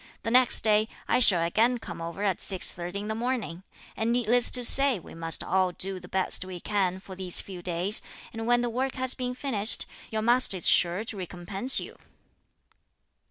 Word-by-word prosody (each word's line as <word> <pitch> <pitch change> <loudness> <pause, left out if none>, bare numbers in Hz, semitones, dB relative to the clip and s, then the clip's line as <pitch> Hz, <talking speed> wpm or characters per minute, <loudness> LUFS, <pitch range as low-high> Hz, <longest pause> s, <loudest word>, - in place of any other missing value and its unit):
The 225 - -3
next 250 0 +5
day, 215 0 +2 0.2
I - - +2
shall 185 -9 +5
again 225 +9 +1
come 225 - -9
over 170 +4 -6
at 195 -4 0
6.30 180 -1 0
in 205 +1 -4
the 220 - -2
morning; 225 -7 -4 0.3
and 225 +1 -1
needless 240 0 +3
to 250 - +1
say 275 -1 +2
we 175 - -13
must 165 0 -1
all 185 0 0
do 190 +1 -4
the - - -13
best 190 -1 -1
we 185 -1 -8
can 190 -1 -1
for 190 0 -12
these 185 -1 +4
few 185 -3 -8
days; 180 +4 +2 0.3
and 225 0 -6
when 240 0 +3
the 240 - -2
work 260 +3 -3
has 260 -1 0
been 250 -1 -5
finished 225 -6 -1 0.2
your 220 -1 -3
master 240 -4 +3
is 175 - +1
sure 175 +4 +3
to 225 -2 -4
recompense 190 +7 0
you." - - -9
210 Hz, 195 wpm, -26 LUFS, 185-240 Hz, 0.3 s, next